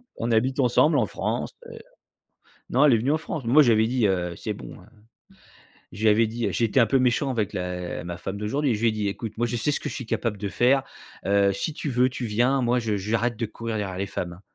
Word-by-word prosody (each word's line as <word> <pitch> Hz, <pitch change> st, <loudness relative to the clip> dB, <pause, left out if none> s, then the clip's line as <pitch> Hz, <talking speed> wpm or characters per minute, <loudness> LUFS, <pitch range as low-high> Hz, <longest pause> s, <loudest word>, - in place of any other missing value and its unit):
On 115 Hz, +1 st, -2 dB
habite 130 Hz, +5 st, +1 dB
ensemble 145 Hz, +4 st, +4 dB
en 110 Hz, -6 st, +2 dB
France -, -, -3 dB, 0.2 s
et -, -, -10 dB
heu -, -, -9 dB, 0.9 s
non, 135 Hz, +4 st, +3 dB
elle 135 Hz, -, +6 dB
est -, -, +5 dB
venue 130 Hz, +6 st, 0 dB
en 155 Hz, -, +2 dB
France. 160 Hz, -3 st, -5 dB
Moi, 140 Hz, +6 st, +6 dB
je 120 Hz, -5 st, +5 dB
lui -, -, +6 dB
avais 110 Hz, -, +2 dB
dit, 120 Hz, -4 st, +2 dB
heu, 90 Hz, -2 st, -1 dB
c'est -, -, -4 dB
bon, -, -, -10 dB
heu. -, -, -17 dB, 1.1 s
Je 105 Hz, -, -9 dB
lui 110 Hz, -, +6 dB
avais 110 Hz, +1 st, +4 dB
dit 115 Hz, -1 st, -2 dB
heu, -, -, -1 dB
j'ai 115 Hz, -, +1 dB
été 120 Hz, +4 st, +2 dB
un 115 Hz, -, +6 dB
peu 130 Hz, +4 st, +2 dB
méchant 130 Hz, +2 st, +1 dB
avec 110 Hz, -4 st, -2 dB
la 90 Hz, -3 st, -4 dB
ma 85 Hz, 0 st, -6 dB
femme 95 Hz, +2 st, -5 dB
d'aujourd'hui. 120 Hz, +4 st, 0 dB
Je 105 Hz, -, -6 dB
lui 115 Hz, -, +4 dB
ai -, -, 0 dB
dit: 105 Hz, -2 st, -2 dB
«Écoute, 110 Hz, +2 st, -5 dB
moi, 120 Hz, 0 st, +1 dB
je 120 Hz, -, -3 dB
sais 145 Hz, +6 st, 0 dB
ce -, -, -1 dB
que -, -, -4 dB
je -, -, -6 dB
suis 130 Hz, -, -5 dB
capable 115 Hz, -1 st, -2 dB
de 100 Hz, 0 st, -4 dB
faire. 130 Hz, +8 st, +3 dB, 0.4 s
Heu, 100 Hz, 0 st, +3 dB
si 150 Hz, +10 st, -3 dB
tu 150 Hz, -, -4 dB
veux, 125 Hz, +1 st, +2 dB
tu 125 Hz, -1 st, -5 dB
viens. 125 Hz, +5 st, +1 dB
Moi, 120 Hz, +1 st, +2 dB
je 110 Hz, -3 st, -1 dB
j'arrête 115 Hz, +4 st, -1 dB
de 115 Hz, -, -1 dB
courir 115 Hz, 0 st, -5 dB
derrière 95 Hz, -3 st, -4 dB
les 100 Hz, -, -1 dB
femmes, 90 Hz, -2 st, -4 dB
hein». 90 Hz, -, -15 dB
115 Hz, 275 wpm, -25 LUFS, 100-125 Hz, 1.1 s, elle